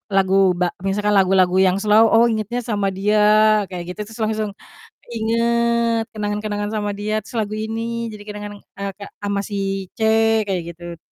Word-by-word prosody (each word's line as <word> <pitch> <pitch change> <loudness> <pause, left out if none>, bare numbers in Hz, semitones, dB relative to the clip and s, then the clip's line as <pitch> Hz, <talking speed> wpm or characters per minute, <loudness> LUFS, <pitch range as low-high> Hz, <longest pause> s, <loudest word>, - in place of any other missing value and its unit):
lagu 190 -1 +2 0.3
ba 180 - +2 0.2
misalkan 205 +1 0
lagu-lagu 185 -1 +3
yang 185 - +1
slow, 215 +2 +5
oh 230 +1 +6
ingetnya 225 +1 -2
sama 205 -2 0
dia 210 +2 +1 0.5
kayak 180 -1 -5
gitu - - -18
terus 225 - -12
langsung 215 -1 -2 0.5
keinget, 235 0 +1
kenangan-kenangan 205 0 -3
sama 205 -1 -1
dia, 215 +1 -2
terus 235 - -12
lagu 215 -1 -2
ini 220 +1 -3 0.3
jadi 210 -1 -10
kenangan, 210 0 -7
eee, 200 0 -7
Kak 200 - -9
sama 200 0 -1
si 195 -1 -3
C 250 - -24 0.5
kayak 180 -3 -1
gitu. 175 0 -9
210 Hz, 160 wpm, -20 LUFS, 195-220 Hz, 0.5 s, oh